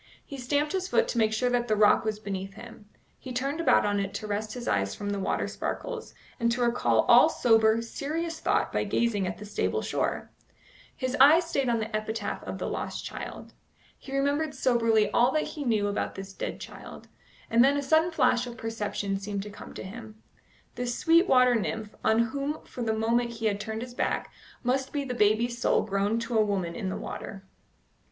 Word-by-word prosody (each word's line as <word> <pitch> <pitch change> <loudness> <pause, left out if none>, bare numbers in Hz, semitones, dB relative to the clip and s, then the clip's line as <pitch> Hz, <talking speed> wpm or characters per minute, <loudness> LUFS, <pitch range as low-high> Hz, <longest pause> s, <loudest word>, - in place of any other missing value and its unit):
He 280 - -8
stamped 290 +4 0
his 375 -1 -1
foot - - +2
to 235 - -1
make 220 -1 +3
sure 245 +3 0
that 240 -1 +1
the 215 - +2
rock 210 0 +5
was 215 -1 -1
beneath 195 -2 -5
him; 225 -3 -12 0.3
he 260 - -8
turned 275 +6 -2
about 330 - +4
on 205 0 +1
it 200 0 -3
to 215 - -4
rest 215 +2 -3
his 245 - -6
eyes 100 -1 0
from 205 0 -4
the 200 - -2
water 190 - -1
sparkles, 485 -3 -5 0.2
and 235 -1 +2
to 245 +1 -1
recall 240 0 +3
all - - +6
sober, 225 -1 +3
serious 320 +7 -4
thought - - +1
by - - +1
gazing 210 -5 0
at 180 - -4
the 210 - -9
stable 205 - -1
shore. - - -2 0.6
His 255 0 -2
eye 300 +5 +8
stayed 285 -7 -1
on 235 - +2
the 220 0 -3
epitaph 215 0 -3
of - - -5
the - - -3
lost - - -4
child. - - -7 0.5
He 270 - -11
remembered 285 +2 0
soberly 230 -5 +2
all 240 +4 +4
that 310 - +2
he 300 - -6
knew 220 -5 +1
about 205 - -2
this 195 0 -8
dead - - -5
child, - - -10 0.4
and 230 +1 +5
then 280 +2 +4
a 285 - -1
sudden 315 +4 +3
flash 250 -6 +2
of 240 -1 -8
perception 210 -3 -3
seemed 200 0 -4
to 210 - -8
come - - -11
to - - -6
him. 215 +2 -9 0.6
This 245 -1 -3
sweet 335 +2 +4
water 250 -1 +5
nymph, 220 -1 -2
on 220 - +3
whom 285 +2 -3
for 250 - -8
the 225 -2 0
moment 235 +2 +1
he 225 -1 -5
had 205 -2 +1
turned 220 +2 -4
his 250 -1 -9
back, - - -2 0.3
must 260 +2 0
be 290 -1 -1
the 260 -2 -4
baby's 235 +2 +2
soul - - +2
grown 200 +2 0
to 230 -1 0
a - - +5
woman 190 -5 -1
in 195 -2 -3
the 185 - -3
water. 195 -1 -7
230 Hz, 210 wpm, -28 LUFS, 210-260 Hz, 0.6 s, eye